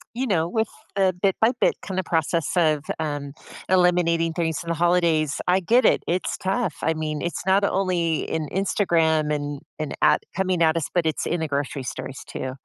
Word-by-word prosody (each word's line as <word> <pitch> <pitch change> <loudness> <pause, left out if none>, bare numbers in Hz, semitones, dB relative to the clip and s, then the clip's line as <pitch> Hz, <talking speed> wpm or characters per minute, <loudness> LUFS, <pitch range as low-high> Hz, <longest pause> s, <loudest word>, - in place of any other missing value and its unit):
you 260 +2 -1
know, 170 -6 +1
with 220 +4 0 0.3
the 190 -1 +3
bit-by-bit 225 +5 +2
kind 190 -2 -4
of 185 - -3
process 165 0 0
of, 155 -4 +2 0.2
um, 145 -2 -3 0.4
eliminating 175 -2 +3
things 160 -3 -1
in 170 - -7
the 170 - 0
holidays. 165 -3 +2
I 185 +2 +4
get 235 +8 +3
it, - - +3
it's 180 +2 -1
tough, 190 -2 -1
I 160 - +2
mean, 155 -1 -3
it's 170 - -3
not 195 +2 +4
only 180 -5 +1
in 155 -2 -2
Instagram 165 -6 +1
and 145 -1 -3 0.2
and 155 - -3
at - - +5
coming 185 -2 0
at 160 0 +4
us, 160 - -1
but 175 -2 +1
it's 155 - -1
in 175 - -1
the 160 - -2
grocery 140 -1 -3
stories, 130 +1 -6
too. 130 - -5
170 Hz, 190 wpm, -24 LUFS, 155-185 Hz, 0.4 s, at